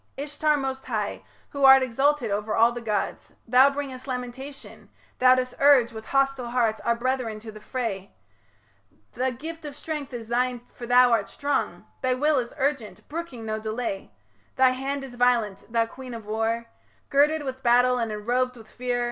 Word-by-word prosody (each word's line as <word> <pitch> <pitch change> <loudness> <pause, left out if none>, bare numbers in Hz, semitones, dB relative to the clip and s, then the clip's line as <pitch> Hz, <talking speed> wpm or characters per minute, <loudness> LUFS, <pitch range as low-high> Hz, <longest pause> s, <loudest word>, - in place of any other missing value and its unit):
Ishtar 295 +1 0
most 265 -1 -4
high, - - -2 0.3
Who 280 -1 -3
art 265 0 +9
exalted 270 -1 +1
over 210 +2 -1
all 230 +1 +5
the 240 0 -6
gods, 210 -3 -3
Thou 255 +4 +6
bringest 275 -2 -6
lamentation; 260 +2 -7 0.3
thou 255 0 +7
dost 255 -1 -2
urge 275 -4 +6
With 220 -1 -9
hostile 275 -3 +1
hearts 235 -3 +1
our 235 - +1
brethren 240 -3 -2
to 220 0 -8
the 215 - -11
fray; 210 -4 -4 1.0
The 260 +1 -1
gift 320 +6 -8
of 295 -2 -7
strength 295 -2 -5
is 235 -3 -7
thine 245 +1 0
for 240 - -8
thou 245 0 +6
art 220 -4 +1
strong; 285 0 -2 0.2
Thy 255 -1 +1
will 295 +2 +2
is 240 -1 -4
urgent, 275 -6 -2
brooking 295 -7 -6
no 215 0 -2
delay; 220 -2 -4 0.4
Thy 260 0 +5
hand 270 +2 -3
is 265 -2 -9
violent, 240 -4 +1
thou 230 -1 +2
queen 250 +1 -9
of 225 -2 -9
war 225 +2 -1 0.5
Girded 295 +2 +3
with 260 -1 -5
battle 245 +1 +4
and 230 -2 -1
enrobed 245 +4 -1
with 220 -1 -14
fear... 250 -1 -2
250 Hz, 175 wpm, -25 LUFS, 230-270 Hz, 1.0 s, art